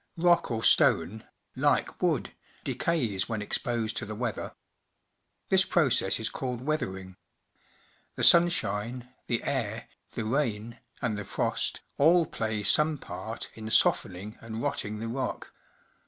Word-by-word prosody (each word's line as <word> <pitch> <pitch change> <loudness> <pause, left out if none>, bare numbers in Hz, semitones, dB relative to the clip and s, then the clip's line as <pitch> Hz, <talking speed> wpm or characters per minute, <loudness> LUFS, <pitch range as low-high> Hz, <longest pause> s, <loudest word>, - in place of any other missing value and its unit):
Rock 175 0 +3
or 115 -2 -2
stone, 95 +7 +3 0.3
like - - 0
wood, - - 0 0.3
decays 120 - -1
when 110 -2 -2
exposed 115 0 0
to - - -2
the 110 - -5
weather. 115 0 -4 0.9
This 190 0 +5
process 130 - +2
is 110 - 0
called 125 -2 -4
weathering. 95 -11 -3 1.0
The - - -3
sunshine, 125 -8 +3 0.2
the 115 - -1
air, - - -3 0.2
the 110 - -4
rain, 115 -3 -2 0.2
and 110 -4 -1
the - - -4
frost, - - -2 0.2
all 165 +4 +5
play 110 -6 -3
some 150 +6 +5
part 110 +1 -6
in 110 -1 -8
softening 100 -1 +1
and 115 0 -6
rotting 105 0 -2
the 115 +2 -5
rock. 130 +3 -4
115 Hz, 130 wpm, -28 LUFS, 105-135 Hz, 1.0 s, This